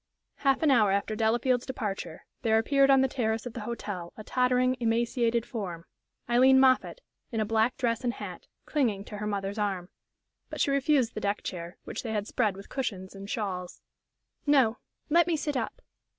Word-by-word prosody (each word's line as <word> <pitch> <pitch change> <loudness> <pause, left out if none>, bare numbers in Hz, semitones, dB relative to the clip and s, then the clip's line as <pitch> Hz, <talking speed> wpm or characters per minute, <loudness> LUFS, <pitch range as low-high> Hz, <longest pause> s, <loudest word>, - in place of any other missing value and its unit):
Half 275 +1 +2
an 305 - +5
hour 220 -6 +5
after 200 +2 0
Delafield's 240 +3 +1
departure 200 -10 -4 0.2
there 220 -2 +3
appeared 275 +4 +3
on 270 -1 +6
the 265 - +3
terrace 225 -3 -1
of 245 - -6
the 235 - -5
hotel 205 -6 -5
a 215 - -8
tottering, 250 +1 +2
emaciated 235 0 +1
form 180 -8 -5 0.4
Aileen 260 +2 +6
Moffatt, 265 - +3 0.3
in 225 - -2
a 215 - +1
black 225 +3 +1
dress 230 -1 0
and 240 -1 0
hat, - - -8 0.2
clinging 225 -10 0
to 210 - -8
her 210 +1 -3
mother's 200 0 -3
arm. 195 -3 -2 0.6
But - - -6
she 280 - +2
refused 275 -3 +2
the 215 - -5
deck 205 0 -1
chair, 175 -1 -6
which - - -5
they 225 -2 -4
had 210 -1 -1
spread 215 -4 0
with 195 +1 -11
cushions 195 -8 -4
and 195 0 -9
shawls. 185 -5 -4 0.6
"No; 260 -6 +4 0.3
let 340 +2 +5
me 335 -2 +1
sit 295 -1 -2
up." 255 - -3
230 Hz, 185 wpm, -28 LUFS, 205-255 Hz, 0.6 s, on